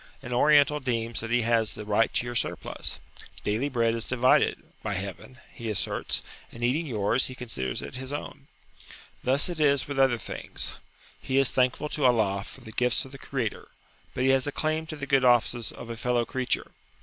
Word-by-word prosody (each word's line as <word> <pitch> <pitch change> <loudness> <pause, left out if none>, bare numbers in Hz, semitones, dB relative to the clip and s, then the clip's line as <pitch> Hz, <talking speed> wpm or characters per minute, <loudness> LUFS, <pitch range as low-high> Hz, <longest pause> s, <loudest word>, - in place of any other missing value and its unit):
An 125 -1 -5
Oriental 150 +2 +5
deems 115 -3 -1
that 115 - -4
he 120 0 +2
has 115 -2 +1
the 105 - -7
right 105 +2 +2
to - - +1
your 120 - -4
surplus. 120 - -2 0.4
"Daily 110 +7 0
bread 115 -3 +2
is 115 -1 -3
divided" 130 0 +3 0.2
(by 105 -2 -2
heaven), 100 +6 -6 0.2
he 115 -2 -5
asserts, 105 - -2 0.3
and 120 - -8
eating 145 +7 +1
yours, 115 +1 +2
he 130 - -7
considers 115 - -3
it 130 - -6
his 130 +1 -7
own. 145 -1 -6 0.8
Thus 135 +3 +3
it 175 -3 -5
is 140 -3 +3
with 140 -1 -3
other 135 -3 +4
things. - - -4 0.5
He 130 - -1
is 135 -1 +5
thankful 130 +3 +1
to 145 -3 -1
Allah 105 -5 +3
for 135 - -12
the 110 -3 -10
gifts 125 +3 +2
of 130 - -12
the 135 - -10
Creator, 125 -7 -3 0.5
but 125 - 0
he 135 - +5
has 135 +1 +2
a - - -1
claim 155 +2 -1
to 155 - -5
the 140 -2 -5
good 135 -2 +3
offices 120 -1 +3
of 115 - -8
a - - -4
fellow 125 0 +1
creature. 130 +2 -2
125 Hz, 200 wpm, -27 LUFS, 115-135 Hz, 0.8 s, Oriental